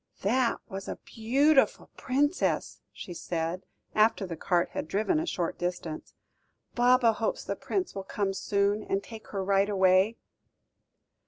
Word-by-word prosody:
"That 235 +4 +2
was 195 0 -7
a - - -3
beautiful 270 +6 +2
Princess," 285 +6 0
she 180 - -8
said, 170 +1 -3 0.3
after 215 -1 +3
the 175 -3 -5
cart 175 +2 +1
had - - -4
driven 220 - +1
a 325 - -3
short 175 - -2
distance. 175 -3 -4 0.6
"Baba 245 -1 +4
hopes 220 +1 -2
the - - -3
Prince 375 -3 -2
will 195 - -5
come 195 0 -2
soon, 200 +2 +1
and 195 -1 -2
take 220 +1 -11
her 195 -2 -3
right 195 +1 +2
away." 190 +2 +3
200 Hz, 145 wpm, -28 LUFS, 190-240 Hz, 0.6 s, Baba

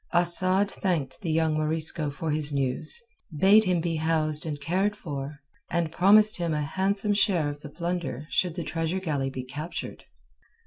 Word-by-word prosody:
Asad 185 +3 +5
thanked 165 -7 -2
the 175 - -4
young 160 0 +1
Morisco 155 0 -1
for 150 +2 -4
his 150 -1 0
news, 140 - -2 0.4
bade 205 +6 +6
him 180 -2 +1
be 165 -1 -2
housed 155 -1 0
and 150 -2 -4
cared 190 +8 0
for, 145 -5 -7 0.3
and 170 -2 -1
promised 210 +5 +5
him 170 -3 -1
a 150 - -1
handsome 195 +6 0
share 190 -7 +2
of 145 0 -7
the 150 - -10
plunder 170 -5 -4
should 180 -3 +1
the 175 - -4
treasure 165 +3 -2
galley 145 -7 -2
be 130 -1 -6
captured. 150 +6 -7
165 Hz, 170 wpm, -26 LUFS, 150-185 Hz, 0.4 s, bade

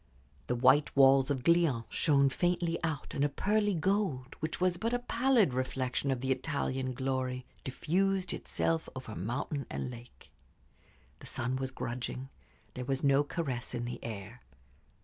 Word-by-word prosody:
The 125 - 0
white 135 +4 +4
walls 135 0 +6
of 135 -3 -1
Glion 165 -8 +3
shone 140 -4 +3
faintly 175 +2 0
out, 160 -3 -3
and 140 - 0
a 145 - +3
pearly 205 +6 +1
gold, 165 -7 0
which 155 +1 -3
was 180 -1 +2
but 230 +4 0
a - - +3
pallid 245 - +2
reflection 130 +1 -1
of 130 -2 0
the 135 0 0
Italian 130 -1 -1
glory, 130 -1 -2 0.2
diffused 185 +7 0
itself 165 -1 -1
over 130 -4 -6
mountain 135 - -3
and 125 - -3
lake. 120 0 -13 0.9
The - - -11
sun 125 +2 -2
was 130 0 -2
grudging; 130 +1 -5 0.4
there 125 - -5
was 135 0 -1
no 140 0 +5
caress 135 -6 -3
in 120 0 -2
the 120 - -6
air. 110 +2 -7
135 Hz, 155 wpm, -32 LUFS, 125-165 Hz, 0.9 s, walls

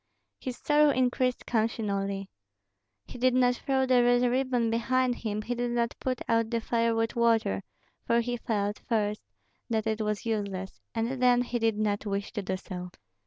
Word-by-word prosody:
His 255 -2 -5
sorrow 295 0 +4
increased 255 -1 +1
continually. 200 -4 -1 0.8
He - - -10
did 255 0 +3
not 250 -1 +3
throw 265 -1 +1
the 255 -1 +4
red 245 0 +4
ribbon 250 -2 +1
behind 255 +2 +1
him, 215 -1 -3
he 245 - -2
did 245 0 -1
not 235 -1 0
put 255 -1 -2
out 230 -1 +2
the 230 0 0
fire 230 0 +1
with 225 0 0
water; 225 - +2 0.5
for 235 0 +3
he 240 +1 -2
felt, 210 -3 -2
first, 210 -2 0 0.5
that 220 -2 0
it 220 0 -1
was 210 0 -2
useless, 200 -4 -3
and 235 +3 -1
then 245 -1 +5
he 245 0 -2
did 225 -2 +1
not 210 0 -1
wish 200 0 -3
to 210 - -2
do 190 -1 -2
so. 180 -1 -7
230 Hz, 175 wpm, -28 LUFS, 210-245 Hz, 0.8 s, then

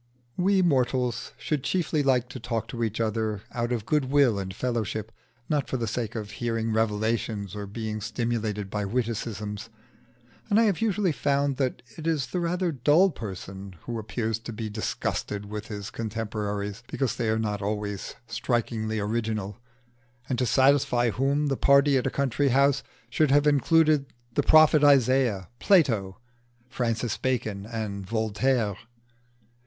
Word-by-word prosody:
We 190 +1 +3
mortals 125 -6 +1
should 150 -4 -2
chiefly 160 -2 0
like 130 -3 +2
to 130 - -7
talk 115 -1 -3
to 120 -2 -3
each 110 -1 -2
other 110 -2 -1
out 120 0 -2
of 115 -4 -2
goodwill 140 -6 +3
and 95 -1 -4
fellowship, 110 -1 -2 0.4
not 145 -3 0
for 130 - -1
the 115 - -2
sake 115 +1 -3
of 105 -3 -5
hearing 115 0 -2
revelations 110 -2 -1
or 105 -1 -5
being 110 +1 -4
stimulated 110 -3 -2
by 105 -1 -1
witticisms; 110 -1 -3 0.8
and 205 +1 +4
I - - +5
have 205 -4 +1
usually 205 -4 +2
found 140 -2 0
that 130 -2 -1
it 160 0 -5
is 155 -5 +1
the 180 - -3
rather 175 +1 0
dull 150 +8 +4
person 95 - -7
who 120 -1 -4
appears 110 0 -2
to 115 +1 -7
be 110 -1 -5
disgusted 105 -1 -3
with 105 +1 -6
his 105 -1 -6
contemporaries 105 -2 -3
because 135 -3 -1
they 115 -2 -1
are 110 - +2
not 105 -2 -2
always 105 -1 -3
strikingly 115 -1 -1
original, 110 0 -2 0.7
and 125 -3 -1
to 125 - +1
satisfy 130 -1 +3
whom 140 +5 +1
the 135 -2 0
party 140 0 +5
at 130 - +1
a - - +2
country 140 +1 0
house 140 +2 +3 0.3
should 155 -2 +2
have 145 +2 +4
included 150 0 +4 0.3
the - - +2
prophet 155 -1 +6
Isaiah, 130 -8 +4
Plato, 115 - +3 0.5
Francis 120 -2 -1
Bacon, 110 -6 -2
and 110 -4 -4
Voltaire. 110 +1 0
115 Hz, 150 wpm, -26 LUFS, 105-140 Hz, 0.8 s, prophet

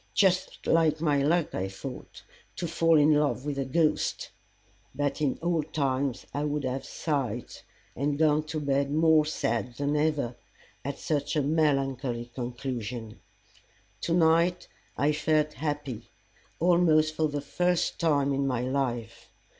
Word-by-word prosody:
Just 185 -1 +1
like 160 -2 +3
my 150 -3 +2
luck, 160 +3 +1
I 95 - -2
thought, 100 +7 -9 0.3
to 175 - -3
fall 165 0 +3
in 150 +1 +5
love 145 -3 +1
with 145 -2 -2
a 135 - -1
ghost! 155 +4 0 0.6
But 145 +2 -1
in 140 -3 +1
old 160 -3 -1
times 135 -3 0
I 145 - -1
would 150 -1 -1
have 130 +1 -2
sighed; 130 -7 -3 0.4
and 140 +2 -1
gone 155 -1 +3
to 155 0 -3
bed 140 -1 0
more 160 0 +4
sad 120 -5 -2
than 145 +2 -1
ever, 150 -5 0 0.5
at 140 +1 -4
such 150 +1 -2
a 150 - +2
melancholy 135 -5 0
conclusion. 120 -3 -5 0.8
To 170 - 0
night 170 +1 +3 0.3
I 145 +2 +3
felt 150 0 +1
happy, 145 -5 -4 0.5
almost 165 -3 +4
for 155 0 +1
the 145 -1 -3
first 175 +5 0
time 145 -4 +2
in 135 0 0
my 125 -3 0
life. 125 -3 -3
145 Hz, 145 wpm, -28 LUFS, 135-155 Hz, 0.8 s, in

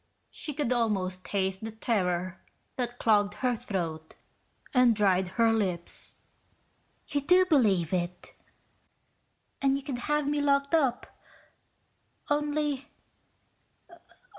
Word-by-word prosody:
She 300 -4 -5
could 280 -4 0
almost 190 -6 -1
taste 190 0 -2
the 220 - -3
terror 185 -5 -1 0.3
that 245 -1 -3
clogged 205 -3 +2
her 245 +3 0
throat 165 -7 -4 0.6
and 250 -3 +5
dried 190 -3 +2
her 230 -1 +4
lips. 185 -6 -1 0.9
"You 285 - -1
do 360 +6 +5
believe 200 - +2
it. 180 0 -3 1.3
And 275 0 +3
you 275 - -7
could 265 -3 -4
have 295 -1 +1
me 290 0 +1
locked 280 0 +1
up. 275 -7 +2 1.3
Only 295 -1 0
230 Hz, 110 wpm, -28 LUFS, 190-280 Hz, 1.3 s, and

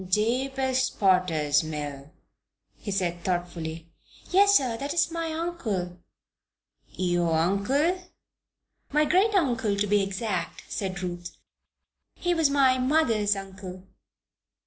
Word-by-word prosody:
"Jabez 260 +5 +1
Potter's 165 -7 +2
mill," 145 -2 -6 0.7
he - - -7
said, 175 -3 -1
thoughtfully. 170 -3 -3 0.4
"Yes, 400 +2 +6
sir. 250 -4 -1
That 280 +6 -4
is 335 - +2
my 330 -1 -3
uncle's 315 - -2
name." 175 0 -19 0.9
"Your 175 -2 0
uncle?" 255 - +1 0.9
"My 300 +1 +3
great 395 +7 +3
uncle, 240 - +1
to 205 - +1
be 205 0 +3
exact," 195 -2 -3
said 190 -2 -4
Ruth. 175 -1 -6 0.8
"He 350 0 0
was 325 -4 +3
mother's 255 -5 +3
uncle." 190 -1 -8
205 Hz, 110 wpm, -26 LUFS, 180-280 Hz, 0.9 s, Yes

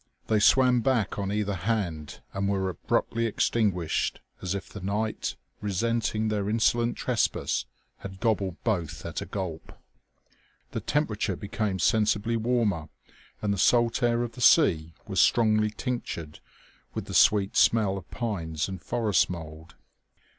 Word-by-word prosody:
They 110 -1 +2
swam 125 +2 +5
back 115 -6 0
on 100 -1 -2
either 105 -1 -1
hand 85 -6 -3
and 100 0 -1
were 95 -1 0
abruptly 115 +6 -1
extinguished 100 -6 0 0.2
as 95 +1 -2
if 100 - -5
the 100 - -9
night, 105 +3 -2 0.3
resenting 110 +2 0
their 105 -1 -1
insolent 115 +2 +2
trespass, - - 0 0.3
had 95 -1 -9
gobbled 100 -6 0
both 85 -9 -2
at - - -4
a - - -6
gulp. 90 -5 -5 1.0
The - - -3
temperature 110 -9 -1
became 105 0 -2
sensibly 110 +4 +2
warmer 110 -9 0 0.5
and 105 -1 +1
the 100 - -3
salt 120 +3 +3
air 120 0 +2
of 120 - -4
the 125 - -10
sea 80 - +4
was - - +1
strongly 110 -2 +3
tinctured 105 - -5 0.6
with - - -3
the - - -8
sweet 100 -2 +4
smell 105 -4 +4
of 95 - -8
pines 85 -10 -3
and 95 -2 -6
forest 110 -4 +1
mould. 80 -2 -8
105 Hz, 140 wpm, -27 LUFS, 95-115 Hz, 1.0 s, swam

